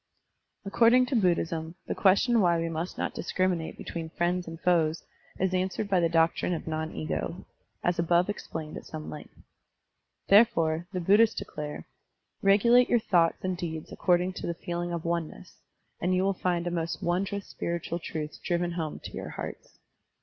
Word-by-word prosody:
According 235 +5 +5
to 260 - -2
Buddhism, 170 -5 0
the - - -2
question 220 +4 +4
why 170 -2 +3
we 165 0 -1
must 165 +2 -4
not - - -2
discriminate 185 -3 -1
between 165 -1 -6
friends 175 +1 -1
and 165 0 -7
foes 165 -2 +2 0.3
is 185 0 0
answered 185 +3 -1
by 190 -2 +3
the 170 -1 +2
doctrine 165 +1 +2
of - - -6
non 160 0 -3
ego, 80 -1 -4 0.4
as 175 -1 +1
above 170 +1 +3
explained 160 -6 -5
at - - -9
some 155 -1 -7
length. 150 - -10 0.9
Therefore, 175 -6 +4
the 185 - -2
Bud 195 +5 +5
dhists 225 -1 +5
declare: 150 0 -6 0.6
Regulate 235 +5 +5
your 240 - +5
thoughts 175 -7 +2
and 185 -1 -1
deeds 160 -3 -5
according 180 0 +1
to - - -5
the 170 - -2
feeling 175 +1 -4
of 170 -1 -4
oneness, 170 +1 -4 0.4
and 180 +2 +2
you 185 - +2
will 195 0 +2
find 175 -2 -1
a 175 - -1
most 165 -1 -3
wondrous 195 +3 -1
spiritual 170 0 -3
truth 155 -2 -5
driven 175 0 0
home 165 -3 -4
to - - -7
your - - -6
hearts. - - -8
175 Hz, 170 wpm, -28 LUFS, 165-190 Hz, 0.9 s, According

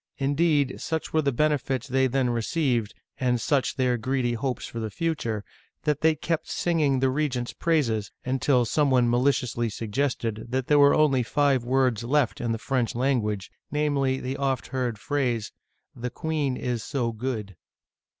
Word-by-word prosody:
Indeed, 145 0 +1
such 160 -1 -3
were 160 - +3
the 140 -2 +1
benefits 135 -2 0
they 130 0 +2
then 130 -1 +1
received, 120 -2 0 0.2
and 125 -2 +1
such 135 +3 +1
their 125 -2 +1
greedy 130 +1 0
hopes 125 +2 -2
for 115 - -6
the 110 -1 -3
future, 115 -7 -2 0.4
that 150 -1 0
they 160 0 +4
kept 165 +2 -2
singing 155 -6 +1
the 135 - +3
regent's 130 -4 -1
praises, 120 -11 0
until 130 -1 +2
some 145 +5 +2
one 125 -2 +4
maliciously 120 -1 +1
suggested 115 0 -2
that 130 0 -1
there 145 +1 +4
were 140 0 +6
only 145 -4 +4
five 135 +1 +2
words 125 -3 +1
left 135 0 +1
in 120 -1 -1
the 115 - 0
French 125 0 -1
language, 115 -6 0 0.2
namely, 140 -3 +1
the 130 +2 -4
oft 135 -3 -1
heard 125 -4 -2
phrase, 120 -3 -1 0.2
" - - -49
The 125 +1 -4
queen 145 -1 -2
is 120 -3 -2
so 120 -3 -1
good 110 -4 -4
130 Hz, 165 wpm, -26 LUFS, 120-145 Hz, 0.4 s, were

